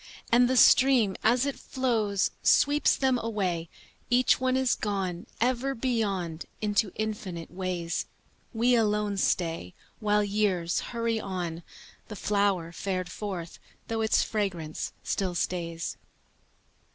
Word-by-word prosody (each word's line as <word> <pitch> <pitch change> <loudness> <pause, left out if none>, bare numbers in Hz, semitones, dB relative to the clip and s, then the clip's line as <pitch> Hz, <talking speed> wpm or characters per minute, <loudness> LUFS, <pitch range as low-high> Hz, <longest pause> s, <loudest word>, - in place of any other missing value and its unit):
And 245 +1 +5
the 260 - +2
stream 250 -7 +6
as 240 +4 +3
it 280 - -3
flows 220 -6 0
Sweeps 290 +1 +4
them 260 -2 +2
away, 185 -8 -2 0.4
Each 250 +1 +4
one 260 0 +2
is 260 -1 +2
gone 195 -1 -3
Ever 255 +3 +1
beyond 200 -9 -1
into 205 -1 +1
infinite 205 -6 -4
ways. 180 -2 -3 0.4
We 240 +2 +2
alone 210 -3 +1
stay 165 - -1 0.2
While 210 -1 +2
years 195 -4 0
hurry 230 -1 -1
on, 175 -5 -4 0.5
The 210 - -7
flower 200 -4 0
fared 185 0 -3
forth, 185 -6 -6 0.3
though 225 0 -1
its 220 0 +3
fragrance 185 -8 -3
still 185 -3 -1
stays. 170 -2 -3
205 Hz, 120 wpm, -28 LUFS, 180-230 Hz, 0.5 s, stream